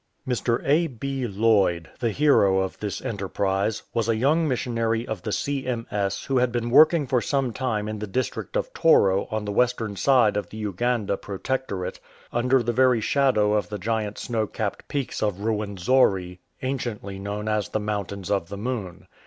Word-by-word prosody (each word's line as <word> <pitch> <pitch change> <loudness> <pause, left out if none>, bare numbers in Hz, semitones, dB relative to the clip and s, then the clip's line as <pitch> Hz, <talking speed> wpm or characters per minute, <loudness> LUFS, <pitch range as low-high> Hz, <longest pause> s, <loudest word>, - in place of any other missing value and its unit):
Mr. 120 -1 0
A. 155 +5 +3
B. 135 -1 -4
Lloyd, 100 -6 +2
the 120 - +1
hero 100 -7 +4
of 95 - -4
this 100 -2 -4
enterprise, 100 0 -1
was 115 -1 0
a 115 - +3
young 150 +8 +2
missionary 115 -3 -1
of 110 -5 -4
the 105 - -4
C.M.S. 115 -6 -2
who 135 -2 +1
had 125 -1 +2
been 120 0 -2
working 155 +2 +6
for 130 -2 +1
some 135 -3 0
time 110 -5 -2
in 110 0 -4
the 105 - -4
district 130 - -3
of - - -3
Toro 100 - +4
on 110 -1 -3
the 105 - -2
western 115 -2 +1
side 115 0 +3
of 105 - -3
the 110 - -9
Uganda 105 0 -1
Protectorate, 100 -2 -4 0.3
under 125 +1 +2
the 120 +1 -1
very 125 -1 +4
shadow 110 -3 +2
of 105 -4 0
the 105 - -4
giant 105 +1 -2
snow 110 -3 -2
capped 105 -1 -4
peaks 140 -3 -3
of 105 -3 +1
Ruwenzori, 100 -3 +1 0.2
anciently 120 -7 -3
known 105 +2 -4
as 105 -2 0
the 110 - -1
Mountains 100 -2 -4
of 95 -4 0
the 100 - -6
Moon. 100 -5 -4
110 Hz, 175 wpm, -25 LUFS, 100-125 Hz, 0.3 s, working